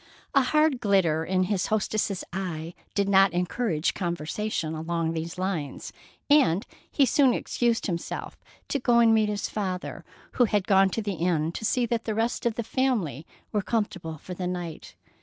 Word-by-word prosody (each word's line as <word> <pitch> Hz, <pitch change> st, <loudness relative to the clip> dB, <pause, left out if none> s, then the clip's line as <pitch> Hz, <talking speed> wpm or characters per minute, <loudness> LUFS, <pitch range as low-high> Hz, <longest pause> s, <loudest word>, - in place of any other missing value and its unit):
A 275 Hz, -, +6 dB
hard 305 Hz, 0 st, +2 dB
glitter 190 Hz, -8 st, +2 dB
in 185 Hz, +2 st, +1 dB
his 195 Hz, 0 st, 0 dB
hostess's 210 Hz, -2 st, 0 dB
eye 170 Hz, -3 st, -4 dB, 0.2 s
did 200 Hz, -1 st, +2 dB
not 195 Hz, -2 st, +5 dB
encourage 180 Hz, -1 st, 0 dB
conversation 170 Hz, 0 st, -2 dB
along 165 Hz, +1 st, -2 dB
these 165 Hz, +2 st, -4 dB
lines, 180 Hz, -7 st, -3 dB, 0.3 s
and 215 Hz, -, +4 dB, 0.2 s
he 280 Hz, -, +3 dB
soon 265 Hz, -1 st, +4 dB
excused 235 Hz, -2 st, 0 dB
himself 170 Hz, -4 st, -4 dB, 0.3 s
to 280 Hz, -, 0 dB
go 240 Hz, -1 st, +3 dB
and 230 Hz, -1 st, +6 dB
meet 215 Hz, -1 st, +3 dB
his 205 Hz, -1 st, -2 dB
father, 185 Hz, -4 st, -4 dB, 0.3 s
who 245 Hz, -, +3 dB
had 205 Hz, -3 st, 0 dB
gone 195 Hz, -1 st, +5 dB
to 225 Hz, +3 st, -3 dB
the 205 Hz, -1 st, -2 dB
inn 165 Hz, -2 st, 0 dB
to 195 Hz, -, -7 dB
see 245 Hz, +3 st, +2 dB
that 230 Hz, -1 st, -2 dB
the 220 Hz, -, -2 dB
rest 230 Hz, +2 st, 0 dB
of 230 Hz, -, -1 dB
the 235 Hz, -, -2 dB
family 215 Hz, -, -1 dB, 0.2 s
were 210 Hz, -, +1 dB
comfortable 185 Hz, -7 st, -2 dB
for 180 Hz, -, -8 dB
the 180 Hz, 0 st, -3 dB
night. 175 Hz, -3 st, -6 dB
195 Hz, 175 wpm, -26 LUFS, 170-225 Hz, 0.3 s, A